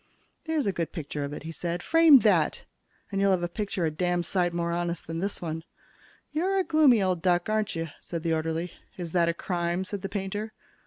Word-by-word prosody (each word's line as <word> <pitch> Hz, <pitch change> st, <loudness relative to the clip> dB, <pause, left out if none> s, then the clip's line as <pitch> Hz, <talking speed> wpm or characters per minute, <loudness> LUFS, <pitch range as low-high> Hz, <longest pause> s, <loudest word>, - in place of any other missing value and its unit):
"There's 320 Hz, -3 st, 0 dB
a 200 Hz, -, +2 dB
good 170 Hz, -3 st, -3 dB
picture 150 Hz, -3 st, -4 dB
of 140 Hz, -, -4 dB
it," 145 Hz, -, -7 dB
he 160 Hz, -, -6 dB
said. 170 Hz, +2 st, -4 dB
"Frame 330 Hz, -3 st, +7 dB
that, 180 Hz, -8 st, +2 dB, 0.5 s
and 195 Hz, 0 st, 0 dB
you'll 200 Hz, -, +4 dB
have 185 Hz, -2 st, +2 dB
a -, -, +1 dB
picture 190 Hz, -1 st, -2 dB
a 160 Hz, -, 0 dB
damn 175 Hz, +2 st, 0 dB
sight 175 Hz, -1 st, +1 dB
more 170 Hz, 0 st, -1 dB
honest 175 Hz, 0 st, -2 dB
than 165 Hz, 0 st, -4 dB
this 195 Hz, 0 st, -3 dB
one." 160 Hz, -1 st, -4 dB, 0.7 s
"You're 365 Hz, +6 st, +1 dB
a 380 Hz, -, +3 dB
gloomy 290 Hz, -, +5 dB
old 185 Hz, -3 st, 0 dB
duck, 175 Hz, +1 st, +2 dB
aren't 215 Hz, -3 st, 0 dB
you?" 165 Hz, 0 st, -2 dB
said 170 Hz, -2 st, -6 dB
the 165 Hz, -1 st, +1 dB
orderly. 165 Hz, +2 st, -2 dB, 0.2 s
"Is 175 Hz, -3 st, -5 dB
that 170 Hz, -1 st, +3 dB
a -, -, +1 dB
crime?" 175 Hz, +1 st, -1 dB
said 200 Hz, 0 st, -5 dB
the 195 Hz, -, -4 dB
painter. 205 Hz, +2 st, -4 dB
175 Hz, 220 wpm, -27 LUFS, 170-205 Hz, 0.7 s, Frame